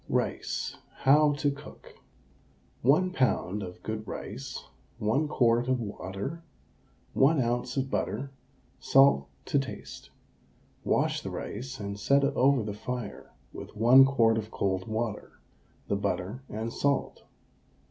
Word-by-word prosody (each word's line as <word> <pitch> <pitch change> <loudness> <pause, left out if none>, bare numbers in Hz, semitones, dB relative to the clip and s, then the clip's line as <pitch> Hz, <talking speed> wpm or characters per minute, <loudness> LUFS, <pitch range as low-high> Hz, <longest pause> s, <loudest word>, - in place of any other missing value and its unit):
RICE, - - -2 0.2
HOW 145 +2 +5
TO 145 0 0
COOK. 140 0 -12 0.9
1 155 +9 +3
lb. 110 - 0
of 90 -1 -9
good 110 0 -4
rice, 70 - -6 0.3
1 115 +9 +1
quart 120 -3 +2
of 130 -1 +1
water, 100 - -5 0.7
1 145 +3 +4
oz. 125 +1 -1
of 135 0 -1
butter, 135 +1 -2 0.5
salt 135 - +5 0.2
to 140 - +2
taste. 135 -1 -7 0.7
Wash - - +1
the - - -5
rice 130 +5 -6
and 100 0 -5
set 140 +5 +3
it 140 +1 +1
over 135 -2 +4
the 105 -1 -4
fire 120 +1 -6 0.2
with - - -9
1 120 +5 +8
quart 115 -5 +3
of 110 0 -6
cold 95 -1 -1
water, 110 0 -3 0.5
the - - 0
butter 100 +8 -2
and 110 +2 -4
salt. 140 -1 0
125 Hz, 130 wpm, -28 LUFS, 110-140 Hz, 0.9 s, 1